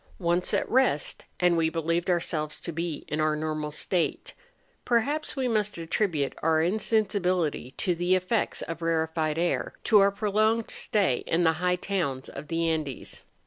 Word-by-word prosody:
Once 175 0 0
at - - +1
rest, 250 - +1
and 180 -1 +4
we 165 -1 +2
believed 165 +2 -1
ourselves 160 -3 -1
to 170 - -4
be 165 -1 -4
in 155 +1 -1
our 155 0 +2
normal 155 0 -2
state; 170 +3 -1 0.5
perhaps 275 +6 0
we 265 -2 0
must 210 -4 0
attribute 165 -3 0
our 160 0 +3
insen¬ 215 +5 +2
sibility 180 -9 -1
to 180 - +1
the 175 +2 +2
effects 185 +5 -1
of 165 0 -6
rarefied 160 -1 0
air, 175 +1 -1
to 215 - +5
our 200 0 +6
prolonged 215 +2 +1
stay 195 - +1
in 170 +2 +2
the 160 -1 +4
high 180 0 +2
towns 170 -9 -2
of 140 +2 -8
the 165 +1 0
Andes. 155 -4 -3
170 Hz, 165 wpm, -27 LUFS, 160-200 Hz, 0.5 s, our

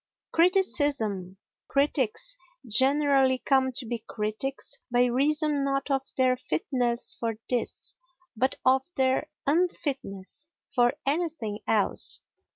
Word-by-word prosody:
Criticism 285 - +2 0.3
Critics 285 - +1 0.3
generally 270 +2 +4
come 260 0 +2
to 245 - -2
be 235 0 -3
critics 220 +7 -3
by 245 0 +3
reason 290 +4 +1
not 275 0 -1
of 270 -1 +2 0.2
their 255 -1 +3
fitness 245 - -1
for 230 -1 -2 0.2
this 245 -2 -2 0.4
but 260 +4 +1
of 260 +1 +4
their 260 0 +1 0.2
unfitness 285 - -2 0.3
for 245 -2 +3
anything 285 -8 -1
else. 215 -3 +1
260 Hz, 105 wpm, -27 LUFS, 235-285 Hz, 0.4 s, generally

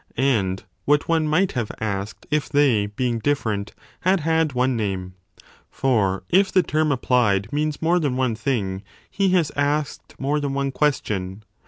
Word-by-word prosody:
and 105 -8 +1 0.2
what 145 0 +2
one 160 -2 +2
might 175 +5 +2
have 120 -5 -3
asked 100 -1 -4
if 150 -2 0
they, 135 -8 +3
being 115 +3 -2
different, 110 -6 -1 0.2
had 185 -1 +2
had 160 -1 +1
one 130 +1 +1
name? 95 -4 -3 0.6
For 105 -8 0
if 190 +2 +3
the 185 - +4
term 155 -2 +1
applied 115 -6 +1
means 150 +1 -1
more 175 +2 +3
than 145 -6 -1
one 130 -3 +1
thing, 110 -6 -2 0.3
he 195 -1 +1
has 170 -5 +2
asked 145 0 -1
more 145 +3 0
than 140 -2 -2
one 140 0 -1
question. 105 -9 -1
135 Hz, 160 wpm, -23 LUFS, 105-150 Hz, 0.6 s, the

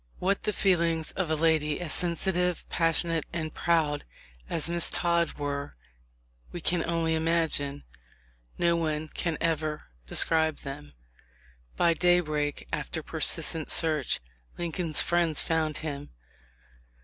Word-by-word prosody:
What 195 +2 0
the 210 - +1
feel 190 -4 +2
ings 165 -1 -1
of 180 -4 -3
a 160 - +2
lady 155 -2 +1
as 175 -4 -1
sensitive, 180 0 +1
passionate, 165 -1 +2
and 160 -2 -4
proud 155 -4 +1 0.5
as 165 - +2
Miss 170 0 +1
Todd 170 -1 +1
were 145 -1 -4 0.8
we 175 - -6
can 170 +1 +1
only 165 -1 0
imagine 160 -3 0 0.4
— - - -35
no 170 -1 +2
one 155 -2 -2
can 165 -1 -2
ever 155 -2 -1 0.2
describe 160 - +4
them. 75 - -8 0.8
By 170 - +4
daybreak, 155 -4 +1
after - - -3
persistent 160 -2 0
search, 155 -5 +2 0.4
Lincoln's 170 -2 0
friends 170 -3 +1
found 160 -2 0
him. 145 -2 -5
160 Hz, 125 wpm, -28 LUFS, 150-170 Hz, 0.8 s, describe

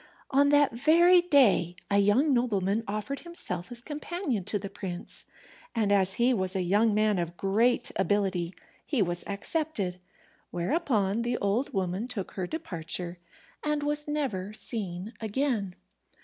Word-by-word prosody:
On 280 +1 +4
that 290 -1 +5
very 340 +8 +6
day 255 - +4 0.2
a 200 - +4
young 235 +9 +4
nobleman 215 -3 +1
offered 215 +7 -3
himself 180 - -6
as 240 0 -4
companion 300 - -3
to 210 - 0
the 200 0 -5
prince, 185 -3 -6 0.5
and 215 -3 +1
as 195 -1 +3
he 245 +2 +3
was 190 -3 -1
a 190 - +1
young 205 +4 +3
man 215 -2 +2
of 170 0 -4
great 230 +5 +2
ability, 190 -3 0 0.3
he 265 -9 +1
was 175 -1 -2
accepted: 200 - -2 0.5
whereupon 210 - 0
the 240 0 -1
old 205 +7 0
woman 190 +4 -2
took 220 -7 -5
her 185 -2 -4
departure, 175 - -3 0.4
and 300 -1 0
was 295 0 0
never 245 -10 -2
seen 205 -2 -4
again. 220 -4 -1
210 Hz, 145 wpm, -28 LUFS, 190-275 Hz, 0.5 s, very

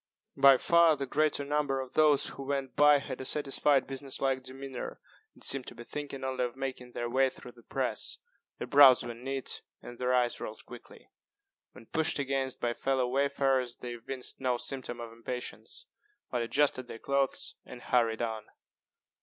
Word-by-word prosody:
By 135 -1 +7
far 170 +2 +5
the 140 - -3
greater 145 +1 +1
number 145 -2 0
of 130 -1 -6
those 150 -2 +4
who - - -9
went 135 -1 -3
by 145 0 +7
had 130 -2 -6
a - - -4
satisfied 140 0 +1
business 135 0 -5
like 135 -1 0
demeanor, 130 0 -7 0.4
and - - -14
seemed 135 -2 +2
to - - -8
be 120 - -9
thinking 140 +1 -6
only 130 -1 -1
of 125 0 -3
making 130 -2 -5
their 120 - -3
way 130 +2 +3
through 125 - -12
the 120 - -19
press. - - -2 0.4
Their - - -4
brows 140 -3 +7
were 120 0 -5
knit, 135 +3 -3 0.2
and 120 0 -11
their 125 0 0
eyes 125 -1 +1
rolled 110 - -7
quickly; 125 -1 -13 0.6
when 115 - -14
pushed 160 +6 +3
against 135 -2 -2
by 120 0 0
fellow 130 0 0
wayfarers 135 -2 +1
they 120 -1 -7
evinced 125 +3 -5
no 125 -2 +1
symptom 125 -1 -4
of 115 -1 -7
impatience, 125 - -6 0.5
but 125 - 0
adjusted 130 +1 +1
their 115 - -8
clothes 140 +2 0
and 125 - -11
hurried 115 -2 +1
on. 110 -2 -4
130 Hz, 180 wpm, -30 LUFS, 125-140 Hz, 0.6 s, By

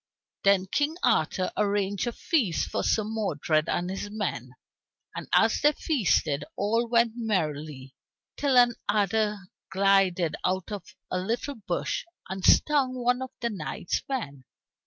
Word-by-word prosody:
Then 195 -1 +4
King 290 - -1
Arthur 185 +4 +1
arranged 200 0 0
a - - 0
feast 235 - 0
for - - -1
Sir 215 - +2
Modred 170 -8 -1
and 175 - 0
his 195 +2 -5
men. 180 - -4 0.6
And - - -6
as 225 0 +3
they 295 +1 +5
feasted 170 - +1
all 230 +4 +1
went 235 0 +3
merrily 155 - -3 0.4
till 275 -3 +2
an 245 -1 +6 0.2
adder 210 0 +1 0.3
glided 190 -3 +2
out 185 +2 -1
of 205 0 -7 0.2
a 185 - 0
little 230 +9 -2
bush 220 -6 -3 0.2
and 190 0 -6
stung 275 -4 +4
one 250 0 +1
of 260 - -4
the 235 -1 -1
knight's 165 -3 -3
men. 140 - -4
205 Hz, 140 wpm, -27 LUFS, 180-235 Hz, 0.6 s, an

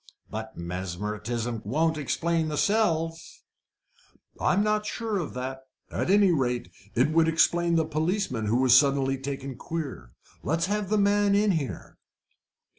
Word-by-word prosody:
"But 110 +1 -6
mesmerism 105 +7 -4
won't 160 +9 +1
explain 165 +3 0
the 150 -1 -3
cells!" 165 -6 0 1.0
"I'm 205 - +2
not 210 0 +1
so - - -4
sure 225 -3 -2
of 165 - -5
that 130 +1 -4 0.3
at - - -2
any 200 -1 +5
rate, 125 - -1 0.2
it 130 +6 +3
would 165 0 +4
explain 170 +1 +2
the 160 -1 +2
policeman 155 - -1
who 115 +3 +2
was 130 -2 +6
suddenly 135 -1 +3
taken 135 -1 -5
queer. 140 - -6 0.3
Let's 165 +3 0
have 205 0 -2
the 215 - +2
man 205 0 +3
in 205 0 +3
here." 155 -7 -4
155 Hz, 145 wpm, -27 LUFS, 125-180 Hz, 1.0 s, was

